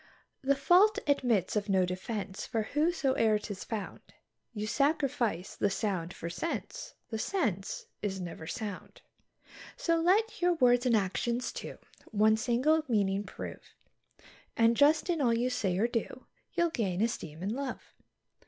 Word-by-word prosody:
The 280 +1 +2
fault 360 +10 +5
admits 240 -10 +1
of 210 0 -1
no 190 -2 +3
defence, 190 +2 -4
for 225 -3 -1
wheresoe'er 280 -8 +2
'tis 205 -2 -6
found, 215 -4 -5 0.5
You 210 -3 -4
sacrifice 255 - 0
the 205 - +1
sound 190 -4 -2
for 170 - -7
sense; 335 - -5 0.2
the 220 - -2
sense 220 - -2 0.2
is 195 -2 -2
never 170 -3 -7
sound. 205 -2 -6 0.7
So 335 -1 +1
let 405 +6 +2
your 355 0 +3
words 245 -3 +4
and 235 - +4
actions, 235 +5 -1
too, - - -7 0.3
one 215 0 +4
single 255 +8 +2
meaning 200 -4 +1
prove, - - -9 0.8
And 230 0 +4
just 295 +4 +4
in 340 -4 0
all 235 -3 +3
you 250 +2 0
say 195 -7 0
or 220 +4 +3
do, 240 +2 -4 0.3
you'll 345 -1 +1
gain 195 - -1
esteem 170 -8 -3
and 200 - -1
love. 265 +2 -5
230 Hz, 145 wpm, -30 LUFS, 200-280 Hz, 0.8 s, fault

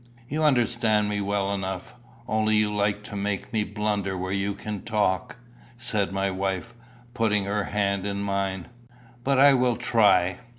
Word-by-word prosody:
"You 155 +4 -1
understand 120 -6 +2
me 105 0 -1
well 100 0 0
enough, 95 -2 -4 0.3
only 110 -2 +2
you 105 0 +2
like 105 0 0
to 105 - -8
make 100 +1 -3
me 110 -1 +2
blunder 105 -2 -2
where 95 +1 -3
you 100 +1 -1
can 105 -1 -5
talk," 95 -3 0 0.4
said 105 -5 -1
my 95 0 0
wife, 95 +3 -3 0.4
putting 110 -4 +1
her 100 +1 -1
hand 100 -1 -1
in 100 0 -2
mine. 95 -2 -2 0.5
"But 135 +1 +2
I 140 +1 +7
will 125 -2 +2
try. 105 -7 +3
105 Hz, 160 wpm, -26 LUFS, 100-110 Hz, 0.5 s, I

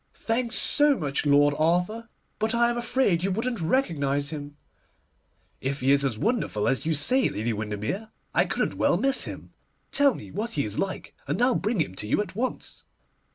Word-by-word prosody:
'Thanks 230 +1 -1
so 295 -2 +5
much, 145 0 -2
Lord 145 0 +5
Arthur; 180 +9 0 0.3
but 220 +2 0
I 235 0 +3
am - - -3
afraid 235 -7 +1
you 190 - 0
wouldn't 225 +2 -2
recognise 150 - 0
him.' 145 -1 -7 1.0
'If 135 +1 -3
he 130 +2 +3
is 140 0 +4
as 130 -6 -1
wonderful 215 - -1
as 135 +3 0
you 160 - +2
say, 250 - +3
Lady 110 +2 -2
Windermere, 110 - -4 0.2
I - - +3
couldn't - - -2
well - - +3
miss 275 0 0
him. - - -9 0.4
Tell 280 -3 +4
me - - -10
what 225 +4 -4
he 145 - 0
is 105 0 -3
like, 195 -1 -4
and - - -1
I'll 250 +1 +4
bring 215 -1 -1
him 95 - -3
to 105 - -4
you - - +1
at 205 -2 -3
once. 250 +4 -4
180 Hz, 190 wpm, -26 LUFS, 140-235 Hz, 1.0 s, so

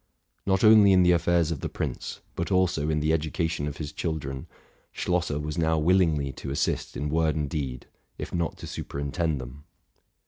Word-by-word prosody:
Not 95 -1 +2
only 110 -3 +8
in 90 -1 +6
the 90 - +5
affairs 85 -1 +2
of 80 - -3
the - - -4
prince, - - -4
but 85 +3 -3
also 90 -5 +2
in 75 -1 +1
the 75 +1 +1
educa 80 +1 0
tion 80 -3 -3
of 75 0 -5
his 75 -2 -5
children, 70 -5 -4 0.4
Schlosser 85 -4 -1
was 75 +2 -3
now 80 0 +2
willingly 80 -4 +2
to 70 - -7
assist 70 - -1
in 75 - -2
word 80 0 +1
and 75 -2 -1
deed, 70 -5 -4 0.3
if - - -6
not 85 -1 -1
to - - -8
superintend 70 +2 -3
them. 65 +3 -9
80 Hz, 185 wpm, -27 LUFS, 75-85 Hz, 0.4 s, only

